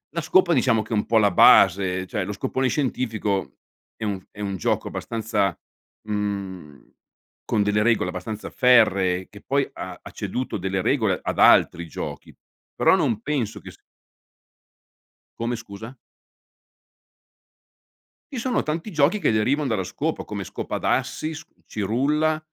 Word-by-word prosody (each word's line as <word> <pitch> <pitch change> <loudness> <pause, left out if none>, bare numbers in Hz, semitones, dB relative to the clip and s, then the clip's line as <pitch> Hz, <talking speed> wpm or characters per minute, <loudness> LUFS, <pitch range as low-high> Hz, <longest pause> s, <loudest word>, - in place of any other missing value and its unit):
La 170 - 0
scopa 175 +2 +3
diciamo 115 -7 +2
che 110 - -6
è - - +2
un 105 - 0
po' 115 - +2
la 105 -3 +4
base, 95 0 +5
cioè 105 -6 -2
lo 100 - -4
scopone 130 +5 -1
scientifico 115 -8 -2 0.4
è 110 - -4
un 95 -3 -3
è 105 - -16
un 100 -1 -3
gioco 90 - -1
abbastanza, 110 -3 -2 0.5
mhmm, 100 -7 -5 0.5
con 105 - +1
delle 105 +1 +1
regole 110 -6 +2
abbastanza 100 +4 -6
ferree 100 -8 +3
che 105 - -14
poi 140 0 0
ha 90 -1 -7
ha - - -11
ceduto 110 +5 -4
delle 95 0 -2
regole 110 -8 +1
ad - - -3
altri 85 0 +5
giochi, - - -7 0.4
però - - +4
non 110 -2 0
penso 125 -5 -2
che - - -11
s - - -15 1.6
Come 120 +1 -1
scusa? 110 +3 -10 2.3
Ci 255 - -4
sono 250 +1 0
tanti 165 +7 -4
giochi 155 +6 +2
che 150 - +2
derivano 130 +6 +1
dalla 95 -5 -1
scopa, - - -3
come - - -5
scopa - - -5
d'assi, 155 +1 -1
s 160 - -9 0.2
cirulla, 140 +10 0
110 Hz, 145 wpm, -23 LUFS, 100-130 Hz, 2.3 s, base